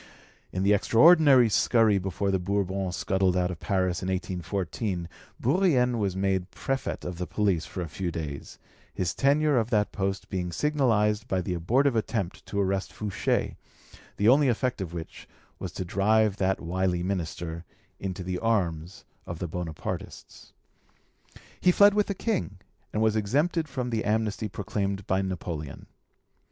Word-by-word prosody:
In 95 - -2
the 100 +1 +4
extraordinary 135 - +6
scurry 110 -1 +3
before 95 +1 -2
the 95 - +1
Bourbons 95 -1 -1
scuttled 95 +2 +1
out 90 0 +1
of 85 - -7
Paris 95 -2 0
in 90 - -4
1814, 95 0 -3 0.3
Bourrienne 130 -6 +2
was 100 -3 -1
made 95 -1 0
Prefet 135 0 -3
of 90 -1 -5
the 90 - -3
Police 100 -6 0
for 95 - -6
a 85 - -3
few 90 +3 -4
days, 75 -5 -6 0.3
his 90 -2 -2
tenure 145 0 +3
of 115 0 -1
that 105 -3 +1
post 95 -1 -2
being 90 -2 -3
signalised 110 - +1
by 95 - 0
the 90 0 -2
abortive 120 - +2
attempt 110 -4 -2
to 100 - -2
arrest 95 0 0
Fouché, 105 -3 -1 0.6
the 105 - +2
only 140 +4 +6
effect 125 -2 0
of 90 -3 -4
which 85 -2 -8 0.3
was - - -5
to 95 - -4
drive 105 +2 +2
that 95 -1 +1
wily 90 0 -1
minister 85 -3 -3 0.4
into 95 -1 -4
the 90 0 -3
arms 90 -6 -1 0.2
of 85 - -5
the 90 - -4
Bonapartists. 80 -1 -6 1.1
He 180 - +4
fled 205 +2 +6
with 210 0 +2
the 200 - -2
King, 185 - -2 0.3
and 110 - 0
was 110 -1 +2
exempted 150 - +1
from 125 -2 -3
the 110 -1 -1
amnesty 110 0 -1
proclaimed 100 0 -3
by 95 +1 +1
Napoleon. 85 -6 -5
100 Hz, 155 wpm, -27 LUFS, 90-115 Hz, 1.1 s, extraordinary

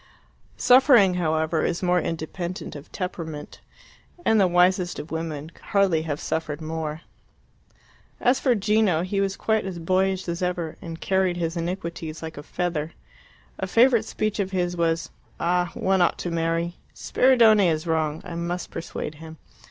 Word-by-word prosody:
Suffering, 250 -7 +6
however, 160 -2 0
is 175 +2 -1
more 180 0 +3
independent 170 +2 -5
of 145 0 -11
temperament, 165 -5 -6 0.7
and 220 -2 +4
the 190 - +5
wisest 180 0 +2
of 150 - -7
women 160 -1 -4
could - - -20
hardly 195 -5 +2
have 150 -2 -3
suffered 155 -2 -3
more. 160 -1 -4 1.2
As 250 +2 +3
for 255 -4 +2
Gino, 210 -5 +2
he 195 +2 -1
was 195 0 -1
quite 220 -1 +1
as 190 -2 -5
boyish 185 +2 0
as 170 +1 -3
ever, 175 -3 -2
and 165 -1 -7
carried 190 -2 +1
his 165 -1 -2
iniquities 170 -2 -4
like 160 0 -6
a - - -6
feather. 165 0 -3 0.7
A 190 - -2
favourite 230 +2 +4
speech 215 -1 -2
of 195 -2 0
his 175 -2 -1
was, 165 -1 0 0.3
"Ah, 175 0 +1
one 190 -1 +1
ought 175 - +3
to 175 - -4
marry! 165 +1 -1 0.2
Spiridione 225 -6 +4
is 155 0 -1
wrong; 160 -2 -1
I - - -7
must 170 +1 -4
persuade 165 -2 -5
him. 160 0 -10
175 Hz, 160 wpm, -24 LUFS, 160-190 Hz, 1.2 s, Suffering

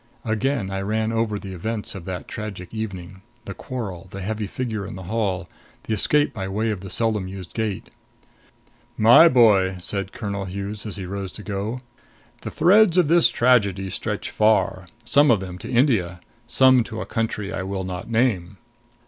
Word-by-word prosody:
Again 110 -2 -1
I 95 0 -2
ran 110 +2 -1
over 115 -2 0
the 95 -2 -8
events 105 +4 -4
of 95 -4 -9
that 95 -1 -6
tragic 100 -4 -7
evening 95 -4 -6 0.2
the - - -6
quarrel; 100 -8 -6
the 100 +1 -8
heavy 105 +1 -3
figure 110 -2 -4
in 95 - -7
the 95 - -8
hall; 95 -2 -2 0.4
the 110 - -3
escape 145 +8 +2
by 95 -4 -4
way 110 +3 -1
of 100 -4 -4
the 95 - -8
seldom 110 -4 0
used 95 -2 -9
gate. 110 -4 -3 1.1
"My 120 +10 +8
boy," 100 -8 +4
said 100 +1 -3
Colonel 100 -3 -4
Hughes 100 +3 -5
as 105 - -4
he 95 -3 -6
rose 95 0 -5
to 105 - -9
go, 105 +5 -4 0.6
"the - - -5
threads 185 +2 +4
of 175 -5 +4
this 170 0 +6
tragedy 100 -6 +2
stretch - - -3
far 100 -4 +2 0.2
some 145 +5 +5
of 115 -4 +4
them 90 -1 -7
to - - -8
India; 115 - +2 0.3
some 130 0 +5
to 110 -2 -7
a - - -4
country 110 -3 -3
I - - -3
will 95 0 -4
not 90 +3 -6
name. 110 -6 0
105 Hz, 180 wpm, -23 LUFS, 95-115 Hz, 1.1 s, My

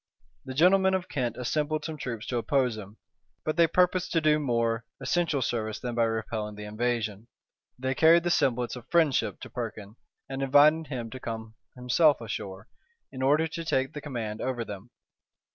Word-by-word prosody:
The 130 - -6
gentlemen 190 +4 +5
of 185 -1 -3
Kent 125 -5 -2
assembled 150 +5 -1
some 160 - -4
troops 120 -7 -5
to 125 - -2
oppose 125 0 +1
him; 105 0 -10 0.5
but 155 - 0
they 170 -1 +5
purposed 180 +1 +2
to 165 - +4
do 155 -1 +3
more 115 -4 0 0.2
essential 145 0 0
service 110 -3 -2
than 125 -2 -4
by 115 0 +2
repelling 110 -1 -3
the 105 - -8
invasion: 110 -1 -2 0.5
they 130 +1 -1
carried 165 +4 +5
the 175 - 0
semblance 125 -6 +1
of 125 - -10
friendship 160 -6 +2
to - - -8
Perkin, 105 +2 -6 0.3
and 135 0 -5
invited 145 +4 +5
him 120 -5 -5
to 130 - -7
come 110 -2 -6 0.2
himself 130 +4 +3
ashore, 105 -3 -6 0.4
in 130 - -7
order 150 +5 +3
to 165 +1 -5
take 135 -4 0
the 150 - -6
command 115 -7 -5
over 125 -3 -2
them. 105 +2 -8
130 Hz, 180 wpm, -28 LUFS, 115-155 Hz, 0.5 s, gentlemen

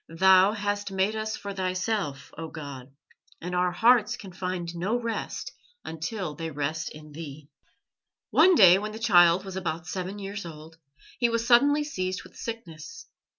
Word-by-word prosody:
"Thou 190 +4 +5
hast 205 -1 -2
made 195 +3 0
us 220 0 -3
for 200 0 -6
Thyself, 185 -5 -2
O 165 0 -6
God, 140 -5 -9 0.5
and 180 +2 -6
our 180 0 +1
hearts 225 +3 +4
can 195 - -10
find 180 -1 -4
no 200 +8 -1
rest 230 -2 -4 0.3
until 165 +1 -4
they 165 +2 -5
rest 155 +2 -3
in 155 0 -12
Thee." 150 -1 -9 0.8
One 360 +3 +6
day, 185 - +8
when 210 +1 -5
the - - -6
child 180 -5 +5
was 190 -1 -7
about 165 -3 -3
seven 185 +4 -5
years 200 0 -6
old, 160 -1 -11 0.4
he 240 -1 +3
was 230 0 -1
suddenly 285 +5 +5
seized 185 -10 -3
with - - -16
sickness. 230 - -8
185 Hz, 160 wpm, -27 LUFS, 165-215 Hz, 0.8 s, day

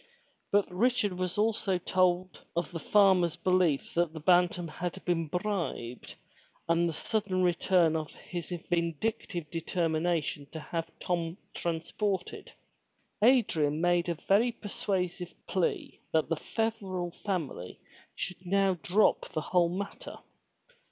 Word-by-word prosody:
But 205 0 +4
Richard 205 -3 +1 0.2
also 210 -3 +1
told 185 0 +1
of 170 -2 -1
the 170 - -4
farmer's 190 -4 +4
belief 175 -4 +1
that 170 -2 +1
the 160 - -6
Bantam 175 +1 +3
had 175 +2 -5
been 165 -2 +1
bribed 175 - -3 0.5
and 170 +1 +3
the - - -3
sudden 190 +1 -1
return 175 -1 +3
of 155 -1 -3
his 175 -2 -6 0.2
vindictive 170 0 -2
determination 165 -3 -1
to 160 - -4
have 165 +1 -4
Tom 170 -1 -2 0.2
transported. 175 +3 -2 0.7
Adrian 165 - +4
made 175 0 +2
a 170 - 0
very 205 +8 +3
persuasive 185 -5 -3
plea 185 -3 -1
that 160 -1 +2
the 165 - +2
Feverel 190 -3 -2
family 165 - -4 0.4
should 180 0 -5
now 190 0 +2
drop 205 +7 +3
the 155 - -2
whole 175 +2 +2
matter. 195 +3 -5
175 Hz, 120 wpm, -30 LUFS, 165-190 Hz, 0.7 s, But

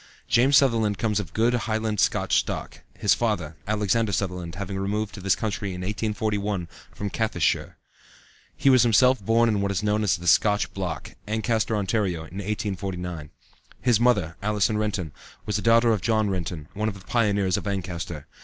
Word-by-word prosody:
James 135 +4 +5
Sutherland 115 -7 +2
comes 105 0 0
of 90 -7 -5
good 115 +6 +2
Highland 110 -3 -1
Scotch - - +2
stock, - - -5 0.2
his 100 -2 +3
father, 95 -9 -1
Alexander 105 +1 +1
Sutherland, 90 -3 -3
having 95 0 -4
removed 105 +2 -2
to 95 - -8
this 95 0 +2
country 100 -3 -3
in 90 - -6
1841, 105 -2 -2 0.2
from 100 -1 -5
Caithness 110 -7 -1
shire. - - 0 0.8
He 135 - +4
was 130 -2 +6
himself 120 0 +4
born 115 +3 +3
in 105 -3 +1
what 100 - 0
is 100 +1 -1
known 105 0 +1
as 100 -3 +2
the 85 - -10
"Scotch 105 +4 +3
Block," 95 -3 -4 0.2
Ancaster, 110 0 0
Ontario, 100 -4 0
in 85 +4 -10
1849. 95 -6 -4 0.5
His 120 -3 +3
mother, 100 -9 +2
Allison 105 +1 +1
Renton, 100 -7 -2 0.3
was 105 0 -1
a - - -4
daughter 115 +1 +4
of 105 -4 0
John 110 0 +1
Renton, 85 -4 -4
one 105 +2 -2
of 105 - -2
the 90 - -17
pioneers 100 -5 +1
of - - -3
Ancaster. 90 -5 -4
105 Hz, 175 wpm, -25 LUFS, 95-110 Hz, 0.8 s, was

